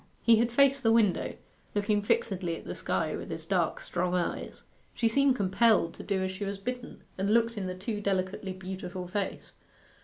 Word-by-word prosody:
He 230 -1 +6
had 235 +1 +2
faced 275 +2 +4
the 225 -2 +3
window, 220 -5 +2 0.4
looking 205 0 +2
fixedly 185 -4 0
at - - -12
the - - -4
sky - - -1
with - - -7
his - - -5
dark - - +1
strong 180 0 -1
eyes. 175 -1 -3 0.3
She 230 - +2
seemed 275 +3 +3
compelled 200 -3 +3
to - - -10
do 190 -1 -1
as 190 - -1
she 190 +2 -6
was 200 0 -3
bidden, 250 +5 -6 0.2
and 200 +2 +1
looked 230 +1 +3
in 195 -3 -3
the 185 - -4
too 210 +3 -4
delicately 190 0 -1
beautiful 185 -1 -6
face. 195 +2 -4
200 Hz, 190 wpm, -29 LUFS, 185-230 Hz, 0.4 s, He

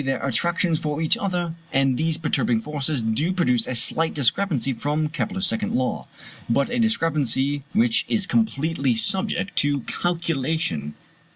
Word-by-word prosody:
their 135 0 -1
attractions 170 +5 0
for 150 -1 -3
each 160 -1 +3
other; 175 -4 -2 0.2
and 135 -1 +2
these 160 +4 +1
perturbing 130 -7 +1
forces 145 0 -2
do 115 +11 0
produce 125 -11 +1
a 130 - -3
slight 160 +7 0
discrepancy 140 - +1
from 150 +5 -1
Kepler's 190 +5 -2
second 215 +1 -1
law, 130 0 -1 0.4
but 140 +4 +1
a 245 - 0
discrepancy 145 - +1
which 225 +2 +3
is 210 -3 +3
completely 160 - 0
subject 190 - 0
to 145 -1 +2
calculation. 160 - -2
155 Hz, 145 wpm, -23 LUFS, 135-175 Hz, 0.4 s, each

